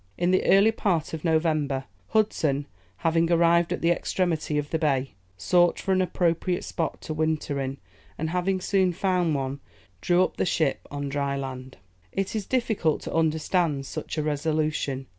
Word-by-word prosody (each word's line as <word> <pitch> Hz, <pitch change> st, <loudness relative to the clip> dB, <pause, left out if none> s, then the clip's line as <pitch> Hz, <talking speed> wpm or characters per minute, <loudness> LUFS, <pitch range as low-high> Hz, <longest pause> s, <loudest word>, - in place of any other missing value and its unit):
In 175 Hz, +1 st, +1 dB
the 185 Hz, -, +3 dB
early 200 Hz, +3 st, +6 dB
part 180 Hz, -9 st, -1 dB
of 160 Hz, -, -5 dB
November, 155 Hz, -5 st, +1 dB, 0.2 s
Hudson, 155 Hz, -10 st, +1 dB, 0.4 s
having 165 Hz, +1 st, +2 dB
arrived 170 Hz, 0 st, +4 dB
at -, -, -2 dB
the 170 Hz, -, +3 dB
extremity 170 Hz, -3 st, -1 dB
of 150 Hz, 0 st, -2 dB
the 160 Hz, -, 0 dB
bay, 135 Hz, -4 st, 0 dB, 0.3 s
sought 175 Hz, -, +3 dB
for 195 Hz, -, -2 dB
an 185 Hz, 0 st, +3 dB
appropriate 175 Hz, 0 st, 0 dB
spot 165 Hz, -, -3 dB
to 155 Hz, -, -5 dB
winter 155 Hz, -2 st, -1 dB
in, 135 Hz, +1 st, -3 dB, 0.4 s
and 160 Hz, +1 st, -2 dB
having 185 Hz, +1 st, 0 dB
soon 190 Hz, -1 st, +2 dB
found 180 Hz, -3 st, +1 dB
one, 135 Hz, 0 st, -3 dB, 0.4 s
drew 180 Hz, +1 st, +3 dB
up -, -, -3 dB
the -, -, +1 dB
ship 155 Hz, -4 st, 0 dB
on 145 Hz, 0 st, -4 dB
dry 140 Hz, 0 st, -1 dB
land. 130 Hz, -1 st, -6 dB, 0.3 s
It 195 Hz, +2 st, -2 dB
is 210 Hz, -3 st, -3 dB
difficult 220 Hz, -, 0 dB
to -, -, -5 dB
understand 160 Hz, -2 st, +1 dB
such 155 Hz, -, -6 dB
a 155 Hz, -, 0 dB
resolution. 150 Hz, -2 st, -1 dB
160 Hz, 170 wpm, -26 LUFS, 145-180 Hz, 0.4 s, early